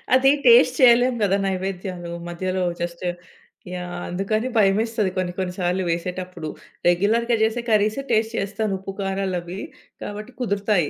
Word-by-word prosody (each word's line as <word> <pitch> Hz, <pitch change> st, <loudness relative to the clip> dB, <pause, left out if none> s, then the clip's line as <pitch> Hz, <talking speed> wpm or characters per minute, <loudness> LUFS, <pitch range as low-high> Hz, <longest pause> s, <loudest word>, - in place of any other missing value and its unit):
అది 265 Hz, +1 st, +5 dB, 0.2 s
టేస్ట్ 475 Hz, 0 st, +7 dB
చేయలేం 245 Hz, 0 st, +6 dB
కదా! 195 Hz, 0 st, +3 dB
నైవేద్యాలు 185 Hz, -2 st, -3 dB, 0.2 s
మధ్యలో 185 Hz, +2 st, -2 dB, 0.2 s
జస్ట్ 175 Hz, +1 st, -4 dB, 0.7 s
యాహ్! 180 Hz, 0 st, -5 dB
అందుకని 215 Hz, +6 st, -1 dB
భయమేస్తది 215 Hz, 0 st, +2 dB
కొన్ని 180 Hz, -1 st, -1 dB
కొన్ని 185 Hz, -1 st, -2 dB
సార్లు 180 Hz, +1 st, 0 dB
వేసేటప్పుడు. 175 Hz, -1 st, -3 dB, 0.4 s
రెగ్యులర్‌గా 225 Hz, +7 st, +3 dB
చేసే 225 Hz, +2 st, +1 dB
కర్రీస్ 215 Hz, +3 st, +2 dB
టేస్ట్ 220 Hz, +1 st, +2 dB
చేస్తాను 205 Hz, +1 st, -1 dB
ఉప్పు, 195 Hz, +1 st, -6 dB
కారాలవి. 190 Hz, -2 st, -2 dB, 0.4 s
కాబట్టి 210 Hz, +4 st, -7 dB
కుదురుతాయి. 200 Hz, -, +1 dB
195 Hz, 125 wpm, -23 LUFS, 180-220 Hz, 0.7 s, టేస్ట్